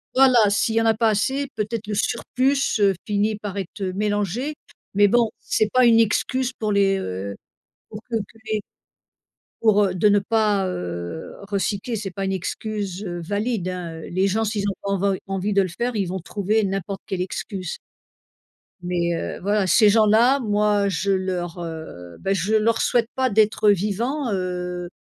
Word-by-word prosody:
Voilà 250 Hz, -5 st, +6 dB
s'il 220 Hz, +2 st, +1 dB
y 225 Hz, -, +4 dB
en -, -, 0 dB
a 225 Hz, -, +5 dB
pas 225 Hz, 0 st, +2 dB
assez, 265 Hz, +7 st, 0 dB
peut-être 215 Hz, 0 st, -3 dB
le 210 Hz, -, -3 dB
surplus, 265 Hz, +6 st, 0 dB, 0.2 s
heu, 195 Hz, -1 st, +5 dB
finit 210 Hz, +1 st, +1 dB
par 205 Hz, -1 st, -6 dB
être 195 Hz, +1 st, -6 dB
mélangé, 210 Hz, -, -1 dB, 0.4 s
mais 205 Hz, +1 st, +5 dB
bon 235 Hz, +1 st, +3 dB
c'est 215 Hz, -1 st, 0 dB
pas 255 Hz, -1 st, +5 dB
une 230 Hz, -1 st, +6 dB
excuse 255 Hz, +4 st, 0 dB
pour 215 Hz, -4 st, -2 dB
les, 195 Hz, -1 st, +3 dB
heu, 95 Hz, -, -4 dB, 0.5 s
pour 210 Hz, 0 st, -8 dB
que 230 Hz, -, 0 dB
que 220 Hz, +1 st, -5 dB
les 215 Hz, -1 st, -1 dB, 1.0 s
pour, 210 Hz, -2 st, +4 dB
heu, 185 Hz, -1 st, -1 dB
de 195 Hz, +4 st, +3 dB
ne 205 Hz, 0 st, +4 dB
pas, 205 Hz, -2 st, +1 dB
heu, 85 Hz, -, -5 dB, 0.2 s
recycler, 200 Hz, +3 st, -1 dB
c'est 195 Hz, -3 st, -5 dB
pas 195 Hz, +2 st, -4 dB
une 190 Hz, -, -1 dB
excuse, 200 Hz, +1 st, -4 dB
heu, 175 Hz, -2 st, -4 dB
valide 205 Hz, +2 st, -2 dB
hein. 170 Hz, -3 st, -5 dB
Les 190 Hz, +3 st, +1 dB
gens 220 Hz, +3 st, 0 dB
s'ils 210 Hz, -1 st, -1 dB
ont 195 Hz, -, -1 dB
pas 200 Hz, -, -3 dB
env 195 Hz, 0 st, +1 dB
envie 195 Hz, +1 st, -2 dB
de 195 Hz, 0 st, +4 dB
le 185 Hz, -, -2 dB
faire, 235 Hz, +6 st, -3 dB
ils 195 Hz, -3 st, 0 dB
vont 185 Hz, +1 st, -4 dB
trouver 210 Hz, +4 st, 0 dB
n'importe 195 Hz, 0 st, -3 dB
quelle 185 Hz, -2 st, -3 dB
excuse. 185 Hz, -1 st, -5 dB, 1.1 s
Mais 175 Hz, -1 st, 0 dB
heu, 165 Hz, -, -4 dB
voilà, 205 Hz, 0 st, +1 dB
ces 210 Hz, +3 st, +6 dB
gens-là, 225 Hz, +5 st, +5 dB
moi 210 Hz, -2 st, +2 dB
je 195 Hz, +2 st, 0 dB
leur, 180 Hz, -2 st, -2 dB
heu, 160 Hz, -, -8 dB
bah 195 Hz, -, 0 dB
je 195 Hz, +4 st, -1 dB
ne -, -, +5 dB
leur 225 Hz, +1 st, +1 dB
souhaite 235 Hz, -1 st, +2 dB
pas 260 Hz, -1 st, +1 dB
d'être 215 Hz, 0 st, +3 dB
vivant, 225 Hz, -, 0 dB
heu, 180 Hz, -1 st, -3 dB
205 Hz, 180 wpm, -23 LUFS, 185-220 Hz, 1.1 s, Voilà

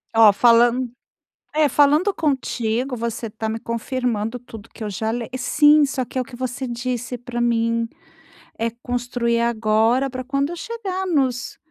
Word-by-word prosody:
Ó, 220 Hz, -2 st, +8 dB
falan 240 Hz, +3 st, +4 dB, 0.7 s
É, 305 Hz, -1 st, +4 dB
falando 300 Hz, +9 st, +3 dB
contigo, 255 Hz, -4 st, -1 dB
você 230 Hz, 0 st, -3 dB
está 220 Hz, 0 st, -5 dB
me 225 Hz, -, -3 dB
confirmando 230 Hz, -1 st, -2 dB
tudo 230 Hz, -3 st, -12 dB
que -, -, -11 dB
eu -, -, -3 dB
já 220 Hz, +3 st, -2 dB
le 230 Hz, 0 st, -3 dB
sim, 295 Hz, +4 st, +5 dB
só 270 Hz, -2 st, -1 dB
que 245 Hz, -, -15 dB
é -, -, +2 dB
o 255 Hz, -, -1 dB
que 245 Hz, -, -11 dB
você 255 Hz, +1 st, -3 dB
disse 245 Hz, 0 st, -3 dB
pra 240 Hz, 0 st, -5 dB
mim, 230 Hz, -1 st, +1 dB, 0.7 s
é 230 Hz, -, +1 dB
construir 240 Hz, 0 st, -2 dB
agora 230 Hz, +3 st, +2 dB
pra 255 Hz, 0 st, -5 dB
quando 275 Hz, +3 st, -1 dB
eu 345 Hz, -, -5 dB
chegar 380 Hz, -1 st, -4 dB
nos 260 Hz, -7 st, 0 dB
245 Hz, 165 wpm, -22 LUFS, 230-270 Hz, 0.7 s, Ó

